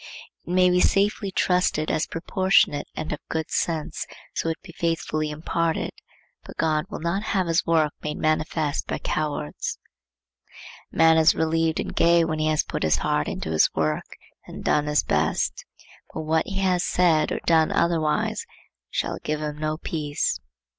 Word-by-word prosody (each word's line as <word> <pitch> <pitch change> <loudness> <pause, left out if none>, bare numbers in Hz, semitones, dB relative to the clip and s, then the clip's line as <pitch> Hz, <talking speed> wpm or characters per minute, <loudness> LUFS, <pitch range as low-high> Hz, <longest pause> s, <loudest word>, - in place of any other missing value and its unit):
It - - -4
may 180 0 +4
be 180 - +3
safely 200 +2 +2
trusted 180 -4 +1
as 155 - 0
proportionate 165 -3 +2
and 155 0 -3
of 150 - -5
good 160 -1 -1
issues, 160 -2 -2 0.3
so 165 - -1
it 165 - -3
be 185 - -11
faithfully 160 -2 -1
imparted, 160 +2 -1 0.5
but - - -12
God 155 -1 +1
will 205 - -6
not 170 +4 -1
have 195 -3 0
his 165 0 +1
work 160 -2 +3
made 150 - -4
manifest 155 -1 0
by - - -2
cowards. 145 - -3 1.1
A - - -16
man 160 0 +6
is 160 0 +5
relieved 160 0 +1
and - - -4
gay 170 0 +4
when 155 -1 -2
he 155 - +1
has 155 -1 +2
put - - -4
his 80 -1 +3
heart 75 0 0
into 80 - -4
his 80 -1 +4
work 75 -1 -2 0.3
and - - -9
done 150 0 +2
his 150 0 +2
best; - - 0 0.5
but - - -5
what 160 +1 0
he 195 - -4
has 185 -2 +2
said 170 -4 +2
or - - -1
done 160 -2 +4
otherwise 160 -3 0 0.4
shall - - -2
give 155 0 -1
him 150 -1 -4
no 155 0 -1
peace. 150 - -2
160 Hz, 170 wpm, -24 LUFS, 155-170 Hz, 1.1 s, man